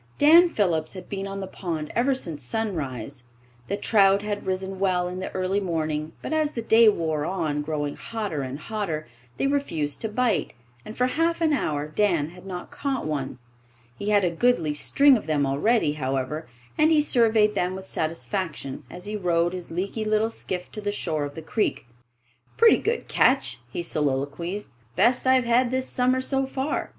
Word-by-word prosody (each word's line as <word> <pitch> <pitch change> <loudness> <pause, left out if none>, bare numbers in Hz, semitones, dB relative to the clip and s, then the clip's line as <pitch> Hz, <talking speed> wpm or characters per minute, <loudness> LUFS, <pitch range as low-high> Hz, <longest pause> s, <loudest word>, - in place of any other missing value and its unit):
Dan 335 +4 +7
Phillips 175 - 0
had 185 -2 -9
been 195 -1 -4
on 195 0 -5
the - - -3
pond 165 -5 -4
ever 260 +3 +2
since 160 - -6
sunrise. 140 - -4 0.4
The 200 - -2
trout 200 -2 +4
had 205 -1 -4
risen 190 0 -2
well 180 -2 +1
in 180 +1 -5
the 185 - -4
early 185 +2 0
morning, 155 -4 -2
but - - -3
as 310 -1 +1
the 230 - -4
day 225 0 +6
wore 160 -6 -1
on, 160 -4 -1
growing 145 -1 -3
hotter 210 -10 -4
and 130 +1 -4
hotter, 165 -3 -3 0.3
they - - 0
refused 220 - -1
to 220 - -2
bite, 215 - 0 0.3
and 215 - -9
for 250 - +3
half 330 +6 +1
an 320 -2 +2
hour 150 - -1
Dan 165 -3 +1
had 180 +2 -13
not 180 -2 -6
caught 275 -3 -2
one. 145 -4 -3 0.6
He 205 - -4
had 205 -2 +4
a 175 - +1
goodly 170 -5 +2
string 275 - +4
of 215 - -8
them 150 -2 +1
already, 150 - +2
however, 135 +2 -3 0.3
and 305 +1 +5
he 310 - +5
surveyed 220 -6 +3
them 185 -2 -1
with 190 0 -8
satisfaction 160 -4 -3
as 180 - -10
he 210 +1 -4
rowed 175 -3 +1
his 180 -2 -6
leaky 195 +6 -3
little 215 +1 +1
skiff 180 -5 -6
to 210 - -6
the 205 0 -1
shore 155 -7 -2
of 145 - -8
the 160 - -7
creek. 210 - -1 0.7
"Pretty 460 -1 +6
good 460 +2 -2
catch," 135 - +2
he 170 - -4
soliloquized. 150 +6 -2 0.2
"Best 250 - +3
I've 260 -1 +4
had 240 +1 +3
this 260 +1 -1
summer, 255 +1 +1
so 270 0 0
far. 270 +2 -2
190 Hz, 185 wpm, -25 LUFS, 155-230 Hz, 0.7 s, Dan